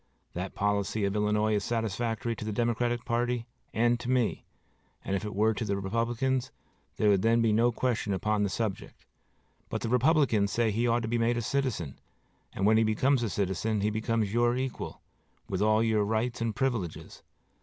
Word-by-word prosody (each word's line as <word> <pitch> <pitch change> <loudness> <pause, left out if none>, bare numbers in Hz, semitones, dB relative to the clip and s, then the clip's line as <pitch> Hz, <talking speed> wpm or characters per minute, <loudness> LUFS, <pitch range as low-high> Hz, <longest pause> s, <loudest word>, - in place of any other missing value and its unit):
That 90 +2 -5
policy 100 +1 0
of 100 +1 -1
Illinois 105 +1 +1
is 105 -1 0
satisfactory 115 0 -2
to - - -6
the 110 - -3
Democratic 120 +1 0
party 120 0 0 0.3
and 120 +1 +2
to 120 +1 -5
me, 125 -3 +1 0.6
and 95 - -1
if 100 - -2
it 105 -2 -5
were 110 +2 +3
to 110 - -3
the 100 -2 -1
Republicans 120 +6 -1 0.5
there 105 - +3
would 100 -2 +3
then 115 +2 +3
be 115 -1 +3
no 115 +3 +3
question 115 -3 -1
upon 105 +2 0
the 100 - +1
subject; 105 -1 -4 0.6
but - - -3
the 115 - -2
Republicans 125 - +3
say 115 +1 +1
that - - -5
he 120 +2 +1
ought 120 0 +1
to - - -2
be 120 +1 0
made 115 +1 +2
a - - 0
citizen, 110 - -2 0.5
and 95 - -2
when 110 +1 +5
he 115 - +4
becomes 125 +5 +2
a 115 - -1
citizen 100 +2 -1
he 105 +1 +1
becomes 110 -1 -1
your 120 +1 +2
equal, 130 -1 -4 0.5
with 95 0 -2
all 110 +1 +3
your 110 -2 +2
rights 110 +3 -1
and 115 -2 -1
privileges. 115 - -3
110 Hz, 195 wpm, -29 LUFS, 105-120 Hz, 0.6 s, when